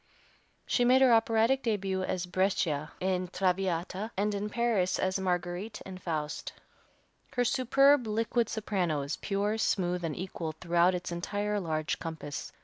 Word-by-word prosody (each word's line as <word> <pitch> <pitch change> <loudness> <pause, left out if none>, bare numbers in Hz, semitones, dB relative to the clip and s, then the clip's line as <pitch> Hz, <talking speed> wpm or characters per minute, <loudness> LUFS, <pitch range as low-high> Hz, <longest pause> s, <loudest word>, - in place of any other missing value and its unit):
She 245 - +2
made 255 +2 +5
her 250 -2 +6
operatic 230 +2 +3
début 195 -5 -1
at 180 -1 -2
Brescia 170 -6 0
in 185 -1 0
"Traviata," 185 +2 -1
and 205 +1 +1
in 205 +1 -2
Paris 225 -5 +1
as 185 +1 0
Marguerite, 180 +3 -2
in 185 -1 -8
"Faust." 155 -4 -3 0.8
Her 245 -1 +1
superb, 275 +1 +4
liquid 225 +1 0
soprano 180 -9 -1
is 140 +2 -3
pure, 205 +2 -1
smooth 180 -4 0
and 160 -3 -2
equal 170 -3 -4
throughout 175 +2 +2
its 180 0 -4
entire 205 +4 -2
large 155 -4 -2
compass. 160 -3 -6
190 Hz, 140 wpm, -30 LUFS, 175-220 Hz, 0.8 s, her